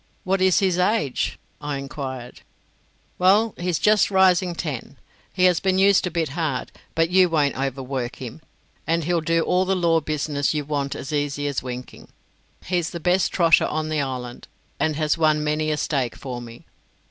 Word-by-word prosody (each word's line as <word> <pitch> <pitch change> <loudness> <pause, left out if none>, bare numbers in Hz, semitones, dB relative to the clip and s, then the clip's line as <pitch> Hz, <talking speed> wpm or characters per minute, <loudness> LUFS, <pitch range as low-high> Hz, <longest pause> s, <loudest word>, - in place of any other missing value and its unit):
"What 190 0 0
is 185 -1 +4
his 185 -2 +2
age?" 180 - 0 0.2
I 145 -1 -3
enquired. 135 -3 -7 0.8
"Well, 200 +5 +4
he's 175 -2 0
just 210 0 +3
rising 185 -2 +3
ten. 145 -4 -5 0.3
He 180 - -1
has 180 -2 +5
been 190 -1 +1
used 195 -1 +4
a - - -1
bit 165 -3 -1
hard, 145 -4 -3 0.2
but 165 +1 +1
you 185 -1 +5
won't 150 -4 +1
overwork 135 -1 -3
him, 130 +4 -9 0.5
and 165 0 +1
he'll 170 +1 0
do 165 +1 +1
all 180 +2 +2
the 190 +1 0
law 170 -2 +3
business 150 -1 -1
you 150 -1 -2
want 140 -1 -2
as 135 +2 -6
easy 145 -1 -1
as 140 -2 -1
winking. 125 0 -8 0.6
He's 175 -2 -1
the 170 - -6
best 180 +2 +2
trotter 165 -3 +4
on 155 0 -2
the 155 -2 0
island, 125 -3 -5 0.3
and 155 -1 +1
has 155 +1 0
won 155 -1 +3
many 155 +1 0
a 155 - 0
stake 135 -6 -1
for 125 -3 -6
me. 115 0 -12
155 Hz, 180 wpm, -23 LUFS, 140-180 Hz, 0.8 s, has